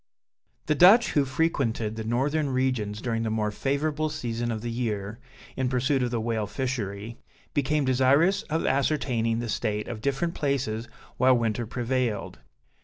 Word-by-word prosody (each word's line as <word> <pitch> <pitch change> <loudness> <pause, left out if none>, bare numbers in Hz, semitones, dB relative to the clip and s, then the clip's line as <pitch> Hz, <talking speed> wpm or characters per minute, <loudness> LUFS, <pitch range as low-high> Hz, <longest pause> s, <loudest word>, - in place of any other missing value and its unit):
The 155 - +2
Dutch 195 +10 +6
who 145 -2 +2
frequented 130 -7 0
the 110 - -4
northern 140 +6 0
regions 125 -5 -1
during 115 -2 -1
the 115 - -1
more 110 -1 0
favorable 150 +6 -1
season 120 -6 -3
of 110 -1 -3
the 120 - -3
year, 110 -2 -3 0.4
in 130 -1 0
pursuit 130 +2 +1
of 125 - 0
the 120 -1 -1
whale 110 -2 -1
fishery, 110 -2 -4 0.3
became 145 +1 +1
desirous 135 +8 +3
of 160 +1 0
ascertaining 130 -5 +1
the 120 0 -3
state 105 -1 -2
of 110 - -6
different 140 +6 -1
places 125 -6 -1 0.3
while 130 0 +5
winter 115 0 -1
prevailed. 120 -2 -2
125 Hz, 155 wpm, -26 LUFS, 110-140 Hz, 0.4 s, Dutch